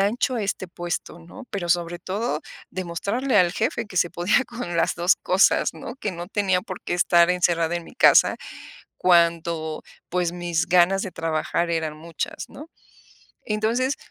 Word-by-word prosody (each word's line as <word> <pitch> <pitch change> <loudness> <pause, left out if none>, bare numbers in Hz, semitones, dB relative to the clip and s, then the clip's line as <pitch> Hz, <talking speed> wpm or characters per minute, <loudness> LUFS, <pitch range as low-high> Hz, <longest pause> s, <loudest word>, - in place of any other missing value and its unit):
ancho, 230 +6 +1
a 225 - -1
este 195 -1 -3
puesto, 175 -1 -5
¿no? 175 +10 -12
Pero 185 -4 -4
sobre 175 0 0
todo, 190 -2 -2 0.3
demostrarle 200 +8 -2
al 175 -2 +4
jefe 230 +1 -1
que 195 - -11
se 175 - +2
podía 180 +10 +2
con 235 -9 -5
las - - +2
2 175 +2 +3
cosas, 185 +1 +3
¿no? 235 - -8
Que 210 -6 -3
no 175 0 -6
tenía 195 -3 +1
por 185 0 -8
qué - - -4
estar 175 0 +4
encerrada 175 -2 +1
en 170 - -6
mi - - -14
casa, - - +5 0.6
cuando, 170 -2 +2 0.3
pues, 175 -1 0
mis 175 -1 -1
ganas 180 +2 +4
de 190 - -4
trabajar 165 +1 -1
eran 160 -2 -2
muchas, 170 - -6
¿no? 300 +3 -11 0.8
Entonces 230 +6 0
175 Hz, 165 wpm, -24 LUFS, 170-205 Hz, 0.8 s, casa